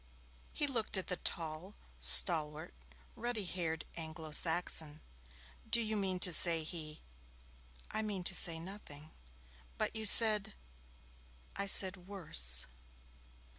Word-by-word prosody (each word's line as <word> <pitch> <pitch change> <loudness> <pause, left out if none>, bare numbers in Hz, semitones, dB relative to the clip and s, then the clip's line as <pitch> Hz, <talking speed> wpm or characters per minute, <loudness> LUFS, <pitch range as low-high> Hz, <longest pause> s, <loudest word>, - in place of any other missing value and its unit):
He 295 - -2
looked 230 -7 -3
at 190 - -6
the 180 - -4
tall, 165 +5 -6 0.2
stalwart, 155 -4 +1 0.4
ruddy 240 -4 -6
haired 165 -3 -6
Anglo 160 -1 -9
Saxon. 160 -2 0 0.7
'Do - - +1
you 220 -1 -2
mean 190 -3 -3
to 180 -3 +3
say 165 -1 +5
he 155 -2 -6 0.4
?' 60 0 -24
'I 220 - -4
mean 205 -4 -6
to 190 - -5
say 165 -2 +5
nothing.' 160 -4 -13 0.7
'But - - -4
you 220 -1 -3
said 215 -1 +6 0.5
' 60 0 -30
'I 200 0 -4
said 190 0 +5
"worse".' 60 - 0
170 Hz, 130 wpm, -32 LUFS, 155-200 Hz, 0.7 s, said